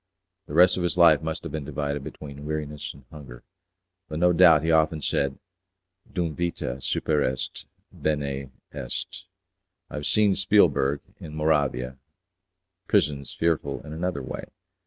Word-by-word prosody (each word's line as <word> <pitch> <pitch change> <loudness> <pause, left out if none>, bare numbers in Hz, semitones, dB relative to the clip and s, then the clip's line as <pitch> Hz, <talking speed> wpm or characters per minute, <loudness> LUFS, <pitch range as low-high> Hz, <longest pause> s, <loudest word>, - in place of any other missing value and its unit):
The 75 - -6
rest 90 +2 +6
of - - -1
his 90 0 -1
life 80 -4 +7
must 80 0 -4
have 85 - -6
been 75 -1 -4
divided 70 0 -3
between 70 0 -9
weariness 75 -1 -4
and 70 -2 -17
hunger, 70 -5 -11 0.7
but 75 - -4
no 90 +2 +4
doubt 85 -4 +7
he 80 - +1
often 80 0 +3
said, 70 -1 -1 0.7
'Dum 85 -4 -2
vita 70 -7 -3
superest, 65 -5 -1 0.3
bene 70 -3 -2 0.2
est'. - - -5 0.7
I - - -6
have 75 - -3
seen 105 -2 +4
at - - 0
Spiegelberg, 85 -8 +3 0.2
in 75 - -9
Moravia, 70 -5 0 0.9
prisons 70 -2 +1
fearful 85 -2 -1
in 75 - -7
another 90 +3 -2
way. - - -6
75 Hz, 145 wpm, -26 LUFS, 70-85 Hz, 0.9 s, life